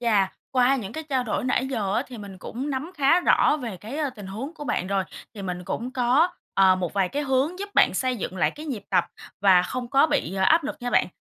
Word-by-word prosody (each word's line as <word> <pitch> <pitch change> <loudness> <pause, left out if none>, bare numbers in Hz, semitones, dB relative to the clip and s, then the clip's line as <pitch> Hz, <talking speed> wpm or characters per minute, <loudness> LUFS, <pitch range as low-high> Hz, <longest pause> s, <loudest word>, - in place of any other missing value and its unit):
Chà! 210 -5 +2 0.2
Qua 255 +1 +4
những 215 -5 -5
cái 315 +4 -6
trao 260 -3 0
đổi 225 - -2
nãy 255 0 +1
giờ 210 -7 -1
á, - - +1
thì 245 -2 -10
mình 200 -3 -9
cũng 255 +9 -5
nắm 275 +5 -3
khá 295 +5 +4
rõ 305 - +4
về 235 -9 -5
cái 225 - -7 0.2
tình 205 -2 -8
huống 240 - -6
của 295 -2 -8
bạn 215 - -1
rồi, 195 0 0 0.3
thì 205 - -7
mình 180 -1 -4
cũng 240 +7 -4
có, 255 +7 +3 0.3
ờ, 190 -1 +5
một 180 -2 -3
vài 195 -2 +1
cái 290 +7 -2
hướng 280 +6 0
giúp 405 +1 -5
bạn - - +5
xây 255 -1 0
dựng 190 -3 -5
lại - - +2
cái 305 +2 -10
nhịp 235 -9 -5
tập - - +3 0.4
và 190 -2 +6
không 245 +6 -4
có 275 +3 +5
bị 185 - -1
áp 300 - +4
lực - - -4
nha 245 0 -3
bạn. - - +3
245 Hz, 250 wpm, -25 LUFS, 195-275 Hz, 0.4 s, và